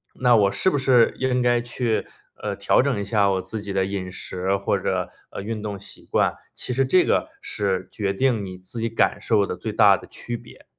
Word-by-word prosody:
那 125 Hz, -1 st, +4 dB
我 100 Hz, -3 st, +4 dB
是 190 Hz, -, +2 dB
不 165 Hz, -, 0 dB
是 130 Hz, -3 st, +4 dB
应 130 Hz, -1 st, +1 dB
该 120 Hz, -1 st, +3 dB
去， 120 Hz, -2 st, -1 dB, 0.3 s
呃， -, -, -4 dB
调 -, -, +3 dB
整 -, -, 0 dB
一 -, -, -2 dB
下 100 Hz, -1 st, +2 dB
我 95 Hz, -1 st, 0 dB
自 110 Hz, +2 st, -6 dB
己 100 Hz, -, -6 dB
的 95 Hz, -1 st, +1 dB
饮 95 Hz, -2 st, -4 dB
食 95 Hz, +1 st, -2 dB
或 100 Hz, 0 st, 0 dB
者， 95 Hz, -1 st, -1 dB, 0.2 s
呃， -, -, -6 dB
运 110 Hz, +1 st, -4 dB
动 105 Hz, -2 st, -5 dB
习 100 Hz, -, -11 dB
惯， -, -, +2 dB, 0.2 s
其 125 Hz, -, -4 dB
实 135 Hz, +2 st, +2 dB
这 180 Hz, +8 st, +4 dB
个 -, -, +1 dB
是 95 Hz, -2 st, -2 dB
决 100 Hz, -2 st, -1 dB
定 115 Hz, -1 st, +1 dB
你 95 Hz, -1 st, -8 dB
自 95 Hz, +6 st, -9 dB
己 115 Hz, -, 0 dB
感 115 Hz, -, +1 dB
受 100 Hz, -2 st, +2 dB
的 -, -, -3 dB
最 110 Hz, -, -4 dB
大 105 Hz, -2 st, +6 dB
的 -, -, -12 dB
区 120 Hz, -, -6 dB
别。 -, -, -16 dB
105 Hz, 245 characters per minute, -23 LUFS, 95-120 Hz, 0.3 s, 大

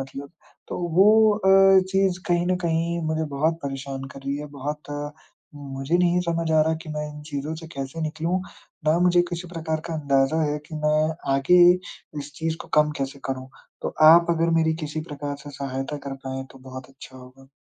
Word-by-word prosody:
मतलब। 135 Hz, +1 st, -7 dB, 0.4 s
तो -, -, -4 dB, 0.2 s
वो 215 Hz, +3 st, +6 dB
अ, 195 Hz, -1 st, +6 dB
चीज़ 190 Hz, -1 st, +2 dB
कहीं 175 Hz, 0 st, +2 dB
न 185 Hz, -, +2 dB
कहीं 170 Hz, 0 st, 0 dB
मुझे 160 Hz, 0 st, -1 dB
बहुत 155 Hz, +4 st, +1 dB
परेशान 135 Hz, -1 st, -5 dB
कर 135 Hz, -, -10 dB
रही 140 Hz, +1 st, -3 dB
है 150 Hz, -, -6 dB
बहुत, 145 Hz, +1 st, -5 dB, 0.4 s
मुझे 140 Hz, +2 st, -2 dB
नहीं 180 Hz, 0 st, +3 dB
समझ 165 Hz, -1 st, -1 dB
आ 155 Hz, -, +5 dB
रहा 160 Hz, +1 st, +1 dB
कि -, -, -12 dB
मैं 150 Hz, 0 st, -3 dB
इन 150 Hz, -, -10 dB
चीज़ों 145 Hz, +2 st, -3 dB
से 165 Hz, 0 st, -9 dB
कैसे 135 Hz, +3 st, -5 dB
निकलूँ, 160 Hz, +4 st, -1 dB, 0.5 s
ना 155 Hz, +2 st, +4 dB
मुझे 175 Hz, 0 st, +4 dB
किसी 175 Hz, +1 st, -5 dB
प्रकार 160 Hz, -2 st, -3 dB
का 165 Hz, -, -4 dB
अंदाज़ा 140 Hz, +1 st, +1 dB
है 150 Hz, -1 st, 0 dB
कि 160 Hz, -, -9 dB
मैं 155 Hz, +1 st, +3 dB, 0.3 s
आगे 140 Hz, +6 st, +4 dB, 0.6 s
इस 145 Hz, +1 st, -9 dB
चीज़ 160 Hz, 0 st, -2 dB
को -, -, -16 dB
कम 150 Hz, 0 st, +1 dB
कैसे 135 Hz, 0 st, -4 dB
करूँ। 130 Hz, -1 st, -4 dB, 0.3 s
तो -, -, -3 dB, 0.2 s
आप 170 Hz, 0 st, +6 dB
अगर 165 Hz, 0 st, +1 dB
मेरी 160 Hz, 0 st, +1 dB
किसी 150 Hz, +1 st, -4 dB
प्रकार 145 Hz, -1 st, -5 dB
से 145 Hz, -, -8 dB
सहायता 135 Hz, 0 st, -4 dB
कर 135 Hz, -, -4 dB
पाएँ 130 Hz, 0 st, -4 dB
तो 135 Hz, -, -14 dB
बहुत 130 Hz, 0 st, -9 dB
अच्छा 130 Hz, -1 st, -13 dB
होगा। 130 Hz, +1 st, -15 dB
155 Hz, 195 wpm, -24 LUFS, 140-170 Hz, 0.6 s, वो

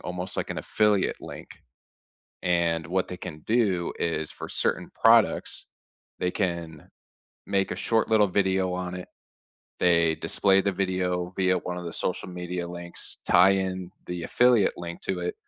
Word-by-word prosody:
almost 90 Hz, +1 st, -5 dB
like -, -, -2 dB
an -, -, -3 dB
affiliate 105 Hz, -3 st, +1 dB
link. -, -, -9 dB, 0.9 s
And 85 Hz, -3 st, +1 dB
what 95 Hz, +1 st, 0 dB
they 90 Hz, -, -6 dB
can 80 Hz, -3 st, -7 dB
do 105 Hz, -7 st, +1 dB
is 80 Hz, -2 st, -1 dB
for -, -, -8 dB
certain -, -, -1 dB
products, -, -, +3 dB, 0.5 s
they 90 Hz, -, 0 dB
can 85 Hz, -5 st, -3 dB, 0.6 s
make 100 Hz, -1 st, 0 dB
a -, -, -3 dB
short 115 Hz, -1 st, +1 dB
little 110 Hz, -2 st, +5 dB
video 95 Hz, -1 st, +1 dB
on 90 Hz, 0 st, -3 dB
it. 90 Hz, 0 st, -7 dB, 0.7 s
They 85 Hz, -2 st, +4 dB
display 95 Hz, +4 st, +2 dB
the 100 Hz, -, +1 dB
video 90 Hz, -1 st, -1 dB
via 95 Hz, -1 st, +2 dB
one 90 Hz, +1 st, -5 dB
of 90 Hz, -, -6 dB
the 85 Hz, -, -5 dB
social 90 Hz, -, -3 dB
media 90 Hz, 0 st, -4 dB
links, 85 Hz, 0 st, -8 dB
tie 90 Hz, +2 st, +6 dB
in 95 Hz, -2 st, -1 dB, 0.2 s
the 90 Hz, -1 st, -4 dB
affiliate 120 Hz, +1 st, +3 dB
link 85 Hz, 0 st, -7 dB
to 95 Hz, -2 st, -2 dB
it, 90 Hz, 0 st, -3 dB
90 Hz, 160 wpm, -26 LUFS, 85-95 Hz, 0.9 s, tie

